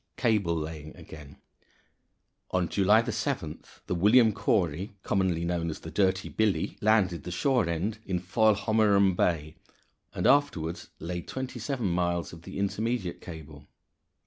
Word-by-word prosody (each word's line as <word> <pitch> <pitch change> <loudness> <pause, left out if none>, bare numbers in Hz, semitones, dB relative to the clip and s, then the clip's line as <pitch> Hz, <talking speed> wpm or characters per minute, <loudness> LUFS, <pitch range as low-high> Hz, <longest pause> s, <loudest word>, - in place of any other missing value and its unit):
Cable 105 -8 +1
Laying 75 -1 -6
again. 75 -2 -12 1.1
On 90 -2 0
July 105 +5 +4
7th - - -4
the - - -2
William 110 +5 +5
Cory 95 -3 0
commonly 90 -4 0
known 85 -1 -1
as 80 - -6
the - - -8
Dirty 95 -1 +1
Billy 105 -7 0
landed 100 -6 +2
the - - -6
shore 115 +2 +1
end 100 +7 -2
in 95 -4 -2
Foilhommerum 100 0 +3
Bay, 80 -4 0 0.6
and - - -2
afterward 90 - +2 0.2
laid 85 +1 -5
twenty 130 -1 -5
seven 135 -6 -3
miles 85 -1 -1
of 85 - -11
the - - -9
intermediate 100 -1 -2
cable. 75 -3 -10
95 Hz, 135 wpm, -28 LUFS, 85-110 Hz, 1.1 s, William